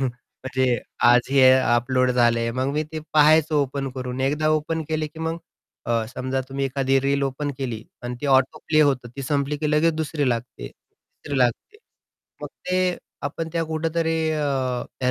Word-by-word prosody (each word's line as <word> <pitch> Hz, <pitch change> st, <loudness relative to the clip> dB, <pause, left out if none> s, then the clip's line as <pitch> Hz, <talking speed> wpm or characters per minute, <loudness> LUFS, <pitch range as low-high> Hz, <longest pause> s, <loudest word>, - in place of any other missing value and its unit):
म्हणजे 130 Hz, 0 st, -2 dB, 0.3 s
आज 120 Hz, 0 st, +7 dB
हे 130 Hz, -2 st, +6 dB
अपलोड 130 Hz, 0 st, +2 dB
झालं 120 Hz, -1 st, +3 dB
आहे. 115 Hz, -, -1 dB
मग 130 Hz, +3 st, -1 dB
मी 150 Hz, +1 st, 0 dB
ते 160 Hz, -, -3 dB
पाहायचं 155 Hz, +1 st, +5 dB
ओपन 140 Hz, -1 st, 0 dB
करून 125 Hz, 0 st, -5 dB
एकदा 150 Hz, +3 st, +1 dB
ओपन 155 Hz, +1 st, 0 dB
केले 155 Hz, -1 st, -1 dB
की 150 Hz, +1 st, -13 dB
मग 160 Hz, +1 st, -2 dB, 0.5 s
अ, 115 Hz, -1 st, +1 dB
समजा 130 Hz, +1 st, -3 dB
तुम्ही 135 Hz, 0 st, -2 dB
एखादी 135 Hz, 0 st, +1 dB
रील 140 Hz, +1 st, 0 dB
ओपन 140 Hz, +2 st, -2 dB
केली 120 Hz, -5 st, -4 dB, 0.2 s
अन् 120 Hz, 0 st, -4 dB
ती 145 Hz, -, -3 dB
ऑटोप्ले 140 Hz, +3 st, +2 dB
होतं, 135 Hz, -5 st, +2 dB
ती 135 Hz, -, -4 dB
संपली 140 Hz, +1 st, -1 dB
की 150 Hz, -1 st, -1 dB
लगेच 155 Hz, +2 st, +3 dB
दुसरी 155 Hz, -3 st, -1 dB
लागते, 120 Hz, 0 st, -3 dB
तिसरी 140 Hz, -2 st, -9 dB
लागते. 125 Hz, -, 0 dB, 0.7 s
मग -, -, -4 dB, 0.2 s
ते 185 Hz, -1 st, +1 dB, 0.3 s
आपण 160 Hz, +3 st, -4 dB
त्या 165 Hz, -1 st, 0 dB
कुठेतरी 160 Hz, +1 st, -1 dB, 0.2 s
अ, 135 Hz, -5 st, -1 dB, 0.2 s
त्या 125 Hz, -, +2 dB
140 Hz, 170 wpm, -23 LUFS, 130-155 Hz, 0.7 s, आज